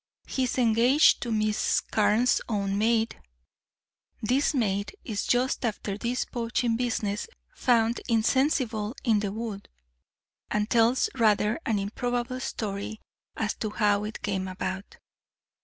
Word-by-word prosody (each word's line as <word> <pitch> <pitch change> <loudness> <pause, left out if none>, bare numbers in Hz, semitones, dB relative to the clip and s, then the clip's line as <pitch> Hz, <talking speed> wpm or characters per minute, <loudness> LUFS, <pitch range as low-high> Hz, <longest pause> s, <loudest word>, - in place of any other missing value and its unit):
He 260 - -1
is 250 - -3
engaged 245 +4 +4
to 240 - -3
Miss 215 -1 +1
Carne's 220 +3 +2
own 200 -3 -1
maid. 225 +2 +1 1.0
This 255 +6 +1
maid 205 - -1
is 210 -4 -3
just 250 +2 +1
after 210 -3 -2
this 235 +4 -2
poaching 235 0 -1
business 225 -4 -1 0.3
found 235 - +2
insensible 235 -1 +1
in 220 -4 +3
the 205 -1 -2
wood, 215 -2 -6 0.8
and 210 0 0
tells 235 +2 +4
rather 215 -1 +2
an 220 - +2
improbable 245 +5 -2
story 215 -4 -4 0.4
as 215 -1 0
to 215 - -2
how 205 -1 +1
it 215 +1 -6
came 190 -2 -1
about. 190 +1 -5
225 Hz, 125 wpm, -27 LUFS, 210-245 Hz, 1.0 s, engaged